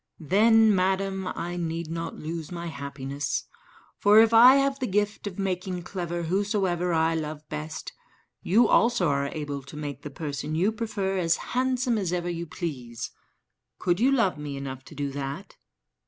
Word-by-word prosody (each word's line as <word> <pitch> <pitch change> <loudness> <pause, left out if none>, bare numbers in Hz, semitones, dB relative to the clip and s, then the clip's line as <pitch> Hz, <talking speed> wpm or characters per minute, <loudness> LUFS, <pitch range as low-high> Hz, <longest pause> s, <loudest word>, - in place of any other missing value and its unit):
"Then, 215 +6 +5
madam, 190 0 0
I 175 0 -4
need 165 -1 -3
not 165 0 -4
lose 160 0 -5
my 170 -1 -5
happiness; 140 -1 -4 0.6
for 205 +1 +6
if 225 0 +5
I 245 +4 +9
have 275 0 +2
the 255 - -1
gift 205 +1 -1
of 185 - -6
making 185 -2 -2
clever 175 -2 -4
whosoever 185 -1 0
I 160 0 +2
love 155 -1 -4
best, 155 +1 -6 0.5
you 225 +5 +4
also 230 -8 +3
are 140 0 +1
able 145 -1 -4
to 140 +3 -11
make 145 -2 -5
the 150 - -6
person 145 0 -4
you 185 +7 +2
prefer 205 -4 -2
as 165 -2 +2 0.2
handsome 255 -2 +1
as 185 -4 -2
ever 175 -1 -1
you 170 0 -4
please. 125 -9 -5 0.7
Could 175 0 0
you 255 +4 +4
love 230 - +2
me 145 -2 -5
enough 135 -1 -6
to - - -12
do 140 -1 -2
that?" 140 0 -6
175 Hz, 170 wpm, -26 LUFS, 150-205 Hz, 0.7 s, I